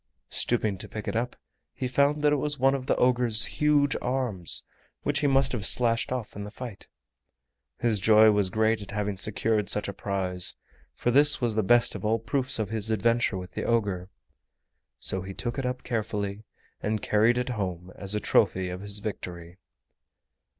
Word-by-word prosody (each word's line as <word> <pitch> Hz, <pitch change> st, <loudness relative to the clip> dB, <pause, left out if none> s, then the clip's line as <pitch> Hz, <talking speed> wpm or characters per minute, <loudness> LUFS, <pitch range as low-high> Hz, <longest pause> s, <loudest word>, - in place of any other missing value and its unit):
Stooping 110 Hz, -5 st, 0 dB
to -, -, -7 dB
pick 105 Hz, -, -7 dB
it -, -, -3 dB
up 120 Hz, +2 st, -2 dB, 0.4 s
he 130 Hz, -, -3 dB
found 140 Hz, +3 st, +1 dB
that 150 Hz, 0 st, +4 dB
it -, -, +2 dB
was 145 Hz, +1 st, -1 dB
one 135 Hz, +1 st, +3 dB
of 135 Hz, -2 st, -4 dB
the -, -, +2 dB
ogre's 125 Hz, -3 st, +3 dB
huge 145 Hz, -2 st, +2 dB
arms 125 Hz, -9 st, 0 dB, 0.4 s
which -, -, 0 dB
he 145 Hz, -, +1 dB
must 135 Hz, -1 st, +4 dB
have 120 Hz, -5 st, -3 dB
slashed 115 Hz, +1 st, +4 dB
off 125 Hz, -4 st, -4 dB
in 100 Hz, -, -6 dB
the 105 Hz, -, -7 dB
fight. 115 Hz, -2 st, -9 dB, 0.9 s
His 115 Hz, -3 st, 0 dB
joy 110 Hz, +1 st, +6 dB
was 105 Hz, -2 st, +2 dB
great 110 Hz, +2 st, +1 dB
at 100 Hz, -, -10 dB
having 105 Hz, -1 st, -2 dB
secured 105 Hz, +1 st, 0 dB
such 105 Hz, -, 0 dB
a 100 Hz, -, -4 dB
prize, 95 Hz, -2 st, +1 dB, 0.4 s
for 120 Hz, -, -1 dB
this 145 Hz, +3 st, +6 dB
was 120 Hz, -3 st, 0 dB
the 110 Hz, -, +1 dB
best 120 Hz, +4 st, +3 dB
of -, -, -7 dB
all 110 Hz, +2 st, +1 dB
proofs 125 Hz, +4 st, -2 dB
of 110 Hz, -3 st, -2 dB
his 110 Hz, -1 st, -3 dB
adventure 110 Hz, -1 st, +1 dB
with 90 Hz, 0 st, -8 dB
the -, -, -5 dB
ogre. 100 Hz, -6 st, -1 dB, 0.9 s
So 95 Hz, -, +1 dB
he 95 Hz, +1 st, -8 dB
took 120 Hz, +3 st, -3 dB
it 130 Hz, -, -2 dB
up 125 Hz, 0 st, -4 dB
carefully 105 Hz, -3 st, -3 dB, 0.4 s
and 110 Hz, 0 st, -1 dB
carried 110 Hz, +4 st, +2 dB
it 125 Hz, +1 st, -2 dB
home 95 Hz, -6 st, -4 dB
as 100 Hz, +1 st, -4 dB
a -, -, 0 dB
trophy 95 Hz, -2 st, +1 dB
of 90 Hz, +1 st, -6 dB
his 100 Hz, 0 st, -3 dB
victory. 90 Hz, -4 st, -7 dB
110 Hz, 190 wpm, -26 LUFS, 100-125 Hz, 0.9 s, joy